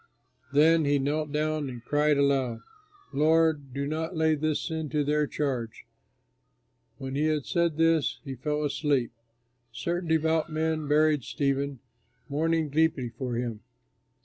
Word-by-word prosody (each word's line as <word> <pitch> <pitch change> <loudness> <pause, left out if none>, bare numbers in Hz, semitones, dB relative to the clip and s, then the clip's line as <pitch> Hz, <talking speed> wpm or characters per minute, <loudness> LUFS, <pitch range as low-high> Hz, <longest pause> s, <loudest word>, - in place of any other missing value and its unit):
Then 160 +3 +5
he 145 0 +3
knelt 145 +2 -1
down 155 -1 -1
and 120 -2 -9
cried 150 +1 +2
aloud, 135 -5 +1 0.5
"Lord, 155 -1 +2
do 140 +2 -3
not 160 +4 -3
lay 160 0 +3
this 155 0 0
sin 160 -2 -3
to 150 +2 0
their 150 +1 +1
charge!" 125 -7 -3 1.1
When 135 0 -6
he 145 +3 +1
had 155 -3 0
said 170 -3 0
this, 165 -1 +2
he 135 - -5
fell 150 +4 -2
asleep. 145 -4 0 0.6
Certain 170 +7 -3
devout 160 0 +1
men 155 -1 -1
buried 150 -1 +3
Stephen, 140 -2 -1 0.5
mourning 160 +2 0
deeply 150 -5 +1
for 120 +1 -4
him. 120 -2 -3
150 Hz, 140 wpm, -27 LUFS, 140-160 Hz, 1.1 s, Then